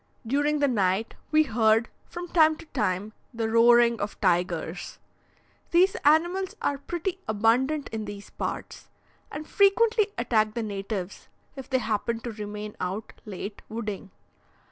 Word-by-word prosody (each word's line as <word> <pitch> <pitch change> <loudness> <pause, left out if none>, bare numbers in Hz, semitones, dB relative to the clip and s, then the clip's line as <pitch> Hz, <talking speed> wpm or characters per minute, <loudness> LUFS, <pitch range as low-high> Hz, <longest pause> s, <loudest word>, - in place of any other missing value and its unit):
During 290 +5 +1
the 285 -1 +2
night, 205 -3 +1 0.2
we 310 0 +5
heard, 225 -3 +3 0.2
from 350 0 -7
time 315 -2 +4
to 330 - -13
time, 210 - -2 0.2
the 225 -1 -1
roaring 235 0 +5
of 205 0 -4
tigers. 175 -2 -1 0.7
These 370 +5 +4
animals 345 +6 +3
are 285 -1 -1
pretty 350 +5 -4
abundant 245 +8 +2
in 220 -1 -4
these 205 0 -9
parts, - - -6 0.4
and 305 +1 -6
frequently 425 +2 +4
attack 215 -3 +1
the 235 - -1
natives 200 -2 -5 0.3
if 270 -2 -9
they 260 - +2
happen 225 0 -1
to 235 - -5
remain 210 0 -6
out 190 +4 -4
late 200 0 -7
wooding. 210 -3 -5
230 Hz, 140 wpm, -26 LUFS, 210-300 Hz, 0.7 s, we